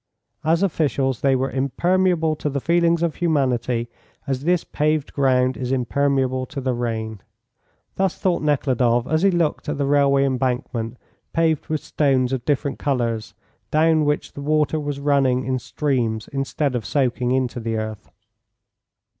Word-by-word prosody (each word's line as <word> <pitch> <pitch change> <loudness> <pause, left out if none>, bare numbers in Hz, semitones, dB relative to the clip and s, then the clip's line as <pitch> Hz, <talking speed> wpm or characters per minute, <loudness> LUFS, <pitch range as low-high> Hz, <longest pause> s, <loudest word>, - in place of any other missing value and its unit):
"As 165 +4 +2
officials 140 -8 0
they 135 -1 +3
were 130 +1 -1
impermeable 165 +4 +1
to 150 - -2
the 140 0 -2
feelings 170 +2 +2
of 170 -2 +1
humanity, 130 -7 0 0.4
as 135 +1 -3
this 175 -1 +2
paved 150 -1 -1
ground 130 -2 +2
is 125 -1 -4
impermeable 130 0 0
to 145 - -6
the 130 -1 -1
rain." 110 -3 -3 0.8
Thus 190 -2 0
thought 180 -2 0
Nekhludoff 130 -5 +1
as 160 +3 +1
he 195 - +5
looked 170 -5 0
at 150 - -2
the 140 - 0
railway 140 -1 +3
embankment 125 -3 -2 0.4
paved 165 -2 +1
with 155 -1 -2
stones 135 -3 +1
of 125 -2 -3
different 145 -1 -1
colours, 120 -6 -1 0.3
down 155 0 +3
which 150 0 -1
the 140 - -7
water 155 +1 +1
was 145 -1 -4
running 135 -3 +2
in 130 0 -1
streams 120 -6 -1
instead 135 0 -1
of 120 -3 -2
soaking 125 -2 0
into 130 -2 0
the 115 -1 -2
earth. 110 -1 -5
140 Hz, 155 wpm, -22 LUFS, 125-155 Hz, 0.8 s, he